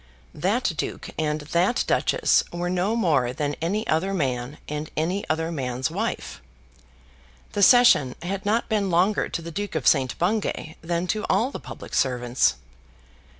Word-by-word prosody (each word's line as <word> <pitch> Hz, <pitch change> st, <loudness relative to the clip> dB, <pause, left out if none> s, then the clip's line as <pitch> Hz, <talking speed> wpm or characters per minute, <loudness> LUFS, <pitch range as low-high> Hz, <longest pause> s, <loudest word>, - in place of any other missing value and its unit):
That 200 Hz, +6 st, 0 dB
duke -, -, -4 dB
and 155 Hz, -1 st, -1 dB
that 170 Hz, +10 st, +1 dB
duchess -, -, +2 dB
were 175 Hz, +1 st, -2 dB
no 185 Hz, +5 st, 0 dB
more 145 Hz, -, +2 dB
than 145 Hz, +2 st, -2 dB
any 200 Hz, +7 st, -1 dB
other 190 Hz, +5 st, 0 dB
man 130 Hz, -3 st, -2 dB
and 150 Hz, +1 st, -4 dB
any 180 Hz, +6 st, 0 dB
other 160 Hz, +1 st, 0 dB
man's 130 Hz, -4 st, -2 dB
wife. -, -, -4 dB, 1.1 s
The 205 Hz, -, -2 dB
session 200 Hz, -, +6 dB
had 195 Hz, +2 st, -3 dB
not 220 Hz, +3 st, +1 dB
been 210 Hz, -4 st, 0 dB
longer 185 Hz, +5 st, +2 dB
to 170 Hz, -, -4 dB
the 170 Hz, -, -7 dB
Duke 205 Hz, +1 st, -4 dB
of 155 Hz, -, -2 dB
St. 130 Hz, -5 st, +3 dB
Bungay 175 Hz, -4 st, -1 dB
than 170 Hz, +1 st, -1 dB
to 210 Hz, +3 st, -1 dB
all 250 Hz, +5 st, +2 dB
the -, -, -6 dB
public -, -, -10 dB
servants. 125 Hz, -, +2 dB
170 Hz, 155 wpm, -24 LUFS, 145-200 Hz, 1.1 s, session